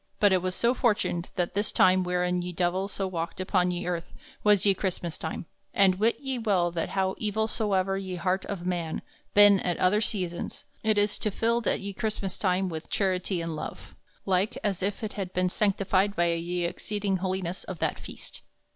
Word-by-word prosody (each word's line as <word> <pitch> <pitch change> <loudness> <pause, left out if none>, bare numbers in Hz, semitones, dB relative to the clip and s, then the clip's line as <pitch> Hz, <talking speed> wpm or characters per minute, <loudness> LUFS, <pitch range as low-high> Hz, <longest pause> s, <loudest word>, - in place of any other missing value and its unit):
But 205 -2 +5
it 185 0 +1
so 235 +5 +2
fortuned 210 -8 0
that 175 -1 0
this 205 +2 +1
time 185 0 +5
wherein 180 0 0
ye 180 0 -4
Divell 180 +3 0
so 195 -1 -3
walked 170 -2 -4
upon 185 -1 +2
ye 175 0 -2
earth 175 -1 -3 0.3
was 210 -2 +5
ye 200 - +6
Chrystmass 180 -4 -3
time; 160 +1 -4 0.3
and 190 -2 +4
wit 225 +2 +2
ye 270 -3 -3
well 190 -6 +2
that 170 -1 -2
how 190 0 +2
evill 220 0 0
soever 195 -3 0
ye 190 -2 -5
harte 185 +2 -1
of 185 -3 -4
man 170 -3 -2 0.3
ben 205 -1 +8
at 175 -1 -1
other 200 +4 +3
seasons, 180 -6 -2 0.2
it 215 -1 +2
is 205 0 +2
tofilled 225 +2 0
at - - +1
ye 200 0 -5
Chrystmass 200 -2 -3
time 190 -1 +1
with 160 -2 -6
charity 185 -2 0
and 165 -1 -3
love, 155 - -7 0.3
like 195 +5 +1
as 195 -3 0
if 200 +4 -2
it 200 -4 -4
ben 180 0 +2
sanctified 200 0 +1
by 170 0 +2
ye 175 +1 -2
exceeding 200 +2 -2
holiness 185 -1 -3
of 185 - -6
that - - -1
feast. - - -10
190 Hz, 190 wpm, -28 LUFS, 180-205 Hz, 0.3 s, ben